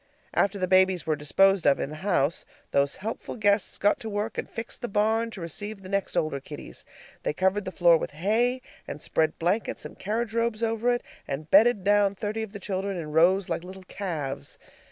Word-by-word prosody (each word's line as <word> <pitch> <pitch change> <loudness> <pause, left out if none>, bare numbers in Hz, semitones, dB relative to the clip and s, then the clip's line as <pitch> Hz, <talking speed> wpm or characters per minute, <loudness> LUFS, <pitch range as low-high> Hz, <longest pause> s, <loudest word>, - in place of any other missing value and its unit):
After 200 0 +2
the 185 -1 -1
babies 185 -1 +4
were 155 -2 +1
disposed 190 +5 +3
of 140 - +4
in 140 - -3
the - - -6
house, 170 -4 0 0.3
those 140 0 +2
helpful 225 - -4
guests 205 -3 +2
got 205 - +2
to 225 - -6
work 210 +2 -2
and - - -4
fixed 225 +1 -6
the 240 - -2
barn 220 +2 +1
to 205 -5 -9
receive 195 +5 -6
the 185 - -9
next 200 -1 -1
older 155 -3 0
kiddies. 145 +2 -10 0.4
They - - -1
covered 190 +4 +1
the 185 - -4
floor 170 -2 +5
with - - -4
hay, 225 - 0 0.2
and - - -6
spread 155 +1 0
blankets 180 +7 -1
and - - -10
carriage 220 +3 -2
robes 230 -1 0
over 225 +1 +1
it, 245 0 +1 0.2
and 150 +3 -5
bedded 210 0 +6
down 205 0 +3
thirty 210 +3 -3
of 220 -2 -5
the 205 - -7
children 195 0 -3
in 155 -3 -5
rows 180 +5 +4
like - - -2
little 185 +1 -10
calves. 150 -8 -5
195 Hz, 205 wpm, -27 LUFS, 170-215 Hz, 0.4 s, bedded